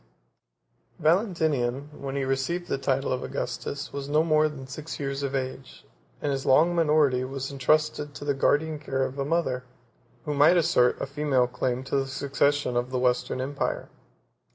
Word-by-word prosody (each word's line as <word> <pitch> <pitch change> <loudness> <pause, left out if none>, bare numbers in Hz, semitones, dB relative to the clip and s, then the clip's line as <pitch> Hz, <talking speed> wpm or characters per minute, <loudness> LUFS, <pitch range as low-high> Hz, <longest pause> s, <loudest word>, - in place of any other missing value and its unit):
] - - -41
Valentinian, 155 - +1
when 135 0 -4
he 140 - 0
received 135 +7 -1
the 135 - -1
title 135 -1 0
of 130 - -2
Augustus, 125 +4 -4
was 140 0 -5
no 155 +2 +3
more 155 -1 +3
than 135 -3 -9
six 150 +4 -7
years 140 -1 -3
of 140 -1 -2
age; 130 0 -5 0.4
and 145 - +1
his 135 -1 -2
long 160 +6 +4
minority 150 -6 +3
was 135 +1 -4
intrusted 145 +1 +1
to 145 - -7
the 145 - +2
guardian 150 +3 +1
care 135 -2 -1
of 130 +1 -4
a 135 - 0
mother, 140 -5 0 0.6
who 150 - -1
might 150 +5 +5
assert 150 -7 +3
a - - -2
female 140 -2 +1
claim 125 +1 -2
to 135 - -1
the 135 0 0
succession 140 0 0
of 120 +1 0
the 130 - -2
Western 125 0 +1
empire. 140 +2 -2
140 Hz, 175 wpm, -26 LUFS, 130-150 Hz, 0.6 s, might